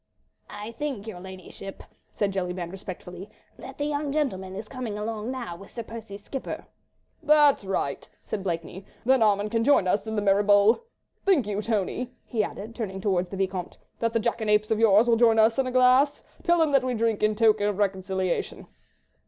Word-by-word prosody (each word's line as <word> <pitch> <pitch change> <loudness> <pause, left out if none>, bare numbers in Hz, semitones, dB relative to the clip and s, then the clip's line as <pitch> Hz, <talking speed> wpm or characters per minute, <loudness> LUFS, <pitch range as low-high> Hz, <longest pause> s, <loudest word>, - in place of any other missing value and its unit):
"I 210 +2 -7
think, 260 -4 -4
your 220 -5 -7
ladyship," 190 +1 -10 0.3
said 205 -2 -1
Jellyband, 180 -2 -3
respectfully, 185 0 -8 0.3
"that - - -10
the 290 - -1
young 290 -1 -2
gentleman 190 -11 -2
is 210 +2 -6
coming 240 -5 -5
along 215 +1 -4
now 250 -9 -5
with 195 +3 -13
Sir 235 - -6
Percy's 220 -3 -9
skipper." 270 +3 -6 0.6
"That's 295 -5 +5
right," 190 -8 -3 0.2
said 205 - -3
Blakeney, 175 +1 -4 0.2
"then 260 0 +4
Armand 210 -1 +2
can 230 0 +1
join 255 -8 +4
us 205 +4 0
in 220 - -3
the 210 - 0
merry 200 0 +4
bowl. 205 - +4 0.4
Think 355 - +3
you, 205 0 -2
Tony," 225 +3 -2
he 220 -3 0
added, 210 +2 -6
turning 205 -5 -4
towards 185 -3 0
the 195 - -6
Vicomte, 190 -2 -3 0.2
"that 230 0 0
that 230 - +1
jackanapes 215 -2 +1
of 220 - +2
yours 220 +1 +5
will 230 -1 +4
join 225 -1 +5
us 225 +3 +4
in 265 - +1
a - - -2
glass? 255 +3 +4 0.2
Tell 345 -2 +3
him 310 - 0
that 275 -2 +4
we 255 -1 -1
drink 225 -1 0
in 215 0 +2
token 215 -2 +3
of 205 -2 -1
reconciliation." 190 -2 -1
215 Hz, 190 wpm, -26 LUFS, 195-240 Hz, 0.6 s, That's